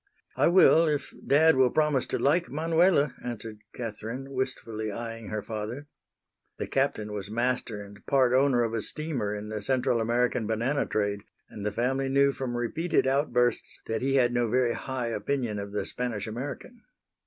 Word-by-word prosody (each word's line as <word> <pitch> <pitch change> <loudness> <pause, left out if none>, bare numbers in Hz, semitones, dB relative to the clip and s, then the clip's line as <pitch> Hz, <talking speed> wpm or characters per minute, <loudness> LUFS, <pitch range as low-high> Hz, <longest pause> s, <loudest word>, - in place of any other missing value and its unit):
"I - - +3
will 170 -2 +6
if 150 -2 -2
dad 160 +4 +5
will 130 -1 +5
promise 150 -2 +1
to - - -1
like 170 +5 +2
Manuela," 160 -2 +2
answered 110 -3 -6
Catherine, 115 +4 -6
wistfully 115 -4 -3
eying 115 0 -6
her 110 0 -3
father. 110 +6 -5 0.7
The - - -3
Captain 135 -6 -1
was 100 -1 -4
master 115 -2 -1
and 100 0 -14
part 130 -3 +3
owner 130 -2 +4
of 115 -1 -2
a 115 - -1
steamer 130 -8 -2
in 105 +1 -6
the 110 -1 -4
Central 125 0 +1
American 120 0 +1
banana 120 +6 0
trade, 100 -1 -1 0.3
and 105 - -8
the 105 - -1
family 135 +4 0
knew 140 +1 +4
from 130 -3 -4
repeated 160 +9 0
outbursts 130 -3 +1
that 110 -1 -2
he 135 +1 +1
had 120 -2 +3
no 120 -1 +1
very 125 0 +2
high 130 -2 -3
opinion 115 0 -2
of 100 0 -6
the 105 - -2
Spanish 120 -5 -3
American. 140 - -6
125 Hz, 170 wpm, -28 LUFS, 110-135 Hz, 0.7 s, will